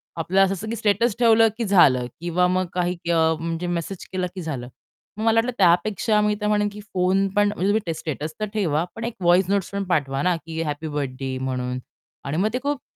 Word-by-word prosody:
आपलं 185 +4 +2
असं 195 +3 -3
की 230 - -2
स्टेटस 220 +1 +1
ठेवलं 225 -1 +6
की 235 - -1
झालं 145 -11 +5 0.2
किंवा 175 +1 +1
मग 185 +1 +1
काही 180 0 0 0.2
अ, 160 -1 +3
म्हणजे 165 +2 -3
मेसेज 175 +2 -4
केला 185 -1 -1
की 185 - -5
झालं. 140 -7 -5 0.5
मग 215 - -3
मला 225 0 +3
वाटलं 240 +2 0
त्यापेक्षा 205 +4 +3
मी 210 0 +1
तर 210 - 0
म्हणेन 210 0 +2
की 210 - -10
फोन 190 +2 +2
पण 205 0 +4
म्हणजे 190 - -1
तुम्ही 220 - +2
ट - - -4
स्टेटस 155 0 -4
तर 215 - 0
ठेवा, 165 -8 +1
पण 225 - -6
एक 235 - -4
व्हॉइस 175 +1 +4
नोट्स 200 -2 0
पण 200 0 -2
पाठवा 135 -3 0
ना 180 -1 +2
की 165 0 -4
हॅपी 150 0 -4
बर्थडे 135 -3 -3
म्हणून 125 -1 -2 0.5
आणि 140 +3 -2
मग 200 +5 +2
ते 250 - 0
खूप 285 -1 -1
180 Hz, 220 wpm, -23 LUFS, 160-210 Hz, 0.5 s, ठेवलं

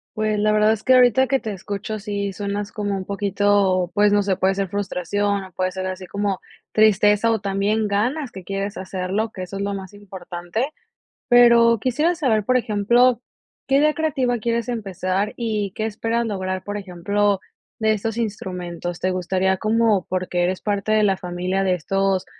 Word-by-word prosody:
Pues, 215 -1 0
la 215 0 +3
verdad 215 +1 +4
es 215 - -6
que 260 0 +5
ahorita 250 +1 +5
que 270 +1 +2
te 215 -2 -5
escucho 205 +3 -5
sí 200 -1 -3
suenas 205 +1 -4
como 205 -2 -2
un 185 - -5
poquito, 200 -2 +1
pues, 205 0 +4
no 205 0 +3
sé, 195 -2 +1
puede 190 +1 +1
ser 195 -1 -1
frustración 200 +1 -1
o 185 - -14
puede 185 0 -1
ser 185 0 -4
así 185 -1 -5
como 200 -1 -2 0.3
tristeza 215 +1 +4
o 220 - +1
también 200 +2 0
ganas 245 +8 -1
que 190 -1 -9
quieres 195 +2 -4
hacerlo, 190 +4 -3
que 185 - -6
eso 195 +2 -7
es - - -4
lo 200 0 -2
más 190 0 -8
importante. 190 - -5 0.6
Pero 235 -2 +6
quisiera 300 +9 +1
saber, 230 - +1
por 255 +4 +2
ejemplo, 235 +3 +3 0.5
¿qué 270 +1 +4
día 305 +1 +3
creativa 270 -6 0
quieres 235 +1 -1
empezar 195 -3 -2
y 215 -4 -2
qué 215 - -2
esperas 225 +2 -1
lograr, 185 -3 -3
por 205 0 -4
ejemplo, 200 +1 0 0.4
de 220 0 +3
estos 220 +2 -3
instrumentos? 180 -5 -4
¿Te 185 - 0
gustaría 185 +1 0
como 215 -3 +2
porque 180 -1 -1
eres 185 +1 0
parte 205 0 -1
de 215 0 +4
la 195 -2 +2
familia 180 +2 -2
de 185 -1 +2
estos 195 +2 0
205 Hz, 180 wpm, -22 LUFS, 190-220 Hz, 0.6 s, Pero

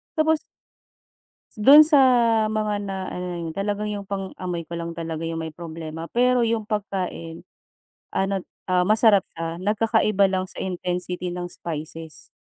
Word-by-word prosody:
tapos 315 -1 +2 1.2
dun 285 +8 +9
sa, 300 -2 +5 0.5
mga 215 -1 -1
na, 195 - -3 0.2
ano 180 - -4
na 175 - -4
yun, 165 - -4
talagang 205 +3 -2
yung 200 -1 -5
pang-amoy 185 -3 -4
ko 170 - -27
lang 170 0 -5
talaga 165 -1 -4
yung 165 0 -3
may 160 - -5
problema, 165 0 -7
pero 245 +1 +2
yung 225 -1 0
pagkain, 190 -6 -4 0.7
ano, 195 -1 -1 0.2
ah, 180 -1 +3
masarap 215 -2 +4
siya 165 0 -4
nagkakaiba 210 0 +2
lang 185 -1 -1
sa - - -8
intensity 180 -1 -3
ng 175 0 -5
spices, 160 -1 -7
185 Hz, 145 wpm, -24 LUFS, 165-210 Hz, 1.2 s, dun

